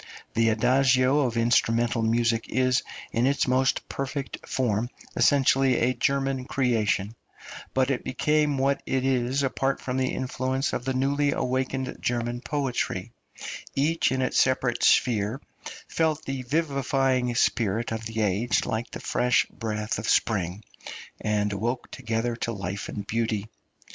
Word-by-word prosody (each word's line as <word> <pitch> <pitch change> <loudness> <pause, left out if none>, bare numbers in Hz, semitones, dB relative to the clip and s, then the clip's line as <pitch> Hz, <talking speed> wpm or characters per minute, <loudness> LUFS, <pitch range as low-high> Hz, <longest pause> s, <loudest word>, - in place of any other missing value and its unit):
The 115 0 +3
Adagio 130 +4 +3
of 125 -5 0
instrumental 115 0 +2
music 115 0 +1
is, 130 -1 +2 0.3
in 120 +3 +2
its 140 0 +1
most 130 +1 +1
perfect 140 0 -5
form, 120 -2 0 0.3
essentially 135 -2 +4
a 125 +2 +2
German 135 -1 0
creation, 110 -6 0 0.6
but 130 +1 +2
it 130 - -2
became 150 +2 +1
what 135 +1 +1
it 130 0 0
is 130 +1 +1
apart 135 0 0
from 125 0 -3
the 130 -1 +1
influence 130 +1 -2
of 125 - -3
the 130 -1 -1
newly 140 +2 +1
awakened 130 0 -2
German 120 0 -1
poetry; 140 -2 -2 0.6
each 150 +1 +2
in 130 0 0
its 130 - +1
separate 130 -1 +1
sphere 110 +1 +3 0.5
felt 155 -1 0
the 135 -1 -3
vivifying 135 -3 0
spirit 115 -1 +1
of 110 0 -3
the 115 0 -3
age 105 +4 +1
like 115 +2 -3
the - - -7
fresh 125 0 +2
breath 105 -2 -3
of 105 - -3
spring, 100 -2 +1 0.6
and 105 -1 0
awoke 120 +5 -3
together 115 -1 -2
to 115 - -2
life 100 -1 -5
and 100 - -5
beauty. 110 -1 -1
125 Hz, 140 wpm, -26 LUFS, 115-135 Hz, 0.6 s, essentially